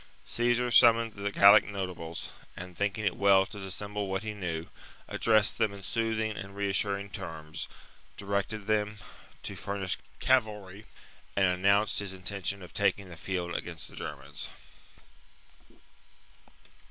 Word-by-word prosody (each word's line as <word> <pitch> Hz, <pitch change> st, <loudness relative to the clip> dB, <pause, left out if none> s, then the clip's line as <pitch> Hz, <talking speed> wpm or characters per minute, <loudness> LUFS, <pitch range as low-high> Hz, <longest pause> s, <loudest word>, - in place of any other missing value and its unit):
Caesar 120 Hz, +1 st, +1 dB
summoned 115 Hz, -2 st, +6 dB
the 100 Hz, 0 st, -3 dB
Gallic 100 Hz, +1 st, +8 dB
notables, 90 Hz, -5 st, -5 dB, 0.3 s
and, 90 Hz, 0 st, -7 dB
thinking 105 Hz, +3 st, -1 dB
it 90 Hz, -4 st, +1 dB
well 100 Hz, -1 st, +5 dB
to 105 Hz, -, -9 dB
dissemble 100 Hz, +1 st, -4 dB
what 95 Hz, +1 st, -2 dB
he 110 Hz, -1 st, -3 dB
knew, 85 Hz, -5 st, -3 dB, 0.4 s
addressed 110 Hz, -2 st, +3 dB
them 110 Hz, -, +3 dB
in 100 Hz, -1 st, -10 dB
soothing 110 Hz, 0 st, 0 dB
and 100 Hz, 0 st, -7 dB
reassuring 100 Hz, 0 st, 0 dB
terms, 80 Hz, -6 st, -6 dB, 0.5 s
directed 100 Hz, +1 st, -2 dB
them 105 Hz, 0 st, 0 dB, 0.5 s
to -, -, -4 dB
furnish 100 Hz, -2 st, -1 dB, 0.2 s
cavalry, 105 Hz, -5 st, +1 dB, 0.5 s
and 95 Hz, -, +4 dB
announced 100 Hz, +3 st, +3 dB
his 100 Hz, -2 st, -4 dB
intention 95 Hz, +1 st, -2 dB
of 90 Hz, -, -12 dB
taking 100 Hz, -1 st, +1 dB
the 90 Hz, -, -9 dB
field 90 Hz, +1 st, -3 dB
against 85 Hz, -3 st, -5 dB
the -, -, -14 dB
Germans. -, -, -6 dB
100 Hz, 130 wpm, -30 LUFS, 95-105 Hz, 0.5 s, Gallic